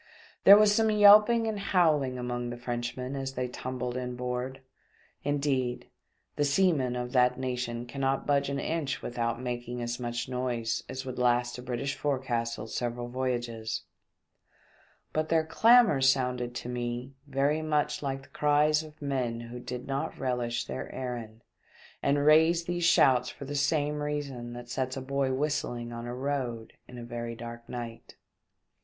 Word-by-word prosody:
There 200 +1 +11
was 210 -1 +5
some 220 +1 +3
yelping 210 +2 +7
and 220 -2 -2
howling 155 -9 +2
among 120 0 -3
the 120 - -5
Frenchmen 120 +2 -4
as 135 -1 -4
they 125 0 -1
tumbled 125 0 -4
in 125 -1 -3
board— 125 +1 -4 0.6
indeed, 140 -4 -1 0.5
the 145 - +2
seamen 145 -4 +2
of 125 0 -3
that 125 -1 +3
nation 125 -2 -3
cannot 135 +1 -1
budge 140 -1 +2
an 140 - -2
inch 150 -3 -2
without 115 -1 -2
making 120 -1 -4
as 120 0 -3
much 120 0 -3
noise 120 -3 -2
as 130 +1 -5
would 130 -1 -5
last 120 0 +1
a - - -6
British 125 +2 -3
forecastle 120 -6 -2
several 120 +1 -3
voyages; 120 -3 -2 1.3
but 155 0 0
their 160 -1 +3
clamour 225 - +5
sounded 125 -2 +1
to 120 - -5
me 125 +1 -4
very 140 +3 +1
much 150 -1 0
like 135 -1 -3
the - - -18
cries 150 +1 +3
of 155 -1 -13
men 125 -4 -1
who 120 +1 -8
did 125 0 -6
not 135 0 -3
relish 120 -2 -1
their 65 0 -5
errand 115 -3 -6 0.6
and 145 +1 +2
raised 160 +2 +5
these 175 -1 -1
shouts 125 -7 +5
for 140 - -9
the 145 - -5
same 145 +1 +1
reason 140 -5 -4
that 120 0 -8
sets 130 +1 -2
a - - -1
boy 135 0 0
whistling 130 -4 -2
on 115 0 -6
a 120 - -4
road 130 -4 -3
in 125 - -11
a 120 -1 -5
dark 115 0 -9
night. 120 -1 -7
130 Hz, 160 wpm, -29 LUFS, 120-145 Hz, 1.3 s, There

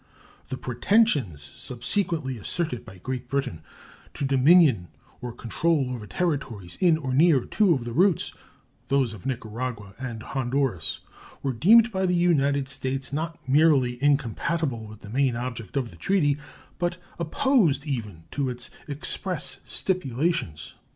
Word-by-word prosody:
The 130 - -3
pretensions 125 - +2
subsequently 130 - -2
asserted 125 - -1
by 95 - -12
Great 125 +5 -5
Britain 135 - -2 0.5
to 140 - -2
dominion 135 - +5 0.3
or 125 - -4
control 135 +4 0
over 110 -4 -7
territories 115 - -2
in 170 -4 +5
or 135 -5 -3
near 150 -1 +5
two 210 -4 +3
of 125 -3 -4
the 120 - -5
routes, 180 +3 +3 0.5
those 135 -5 +1
of 110 +3 -8
Nicaragua 115 -4 -4
and 120 -4 -5
Honduras, 130 - -1 0.4
were 135 -2 0
deemed 225 - +6
by 190 -2 0
the 180 - +2
United 145 -6 +2
States 135 0 -2
not 165 0 -4
merely 135 -3 +3
incompatible 140 -2 0
with 110 0 -12
the 100 - -10
main 130 0 +2
object 115 -2 -5
of 125 -4 -1
the - - -14
treaty, 175 -8 +2 0.4
but 175 0 -1 0.2
opposed 170 - +2
even 110 - -4
to 140 -2 -1
its 125 -1 -5 0.2
express 155 +5 -1
stipulations. 150 - -1
135 Hz, 135 wpm, -26 LUFS, 120-165 Hz, 0.5 s, deemed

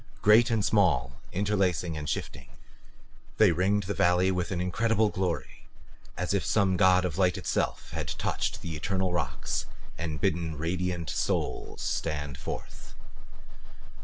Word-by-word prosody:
Great 110 +3 +6
and 110 -3 +1
small, 75 - +2
interlacing 95 -4 0
and 75 -1 -4
shifting, 65 -1 -4 0.9
they 110 -4 +6
ringed 95 +5 +1
the 100 +2 -3
valley 90 +1 +3
with 90 -2 -1
an 95 - -2
incredible 110 +4 +1
glory 90 -4 -3 0.5
as 90 +2 -1
if 100 - +1
some 100 -3 +2
god 95 0 +4
of 90 0 -3
light 90 -2 +3
itself - - -2
had - - -4
touched - - -2
the 80 -2 -4
eternal 95 +3 -1
rocks 70 -8 -2 0.3
and 80 -3 -3
bidden 80 -2 0
radiant 85 +1 -2
souls - - -2
stand 75 -4 -2
forth. - - -8
90 Hz, 135 wpm, -28 LUFS, 80-100 Hz, 0.9 s, Great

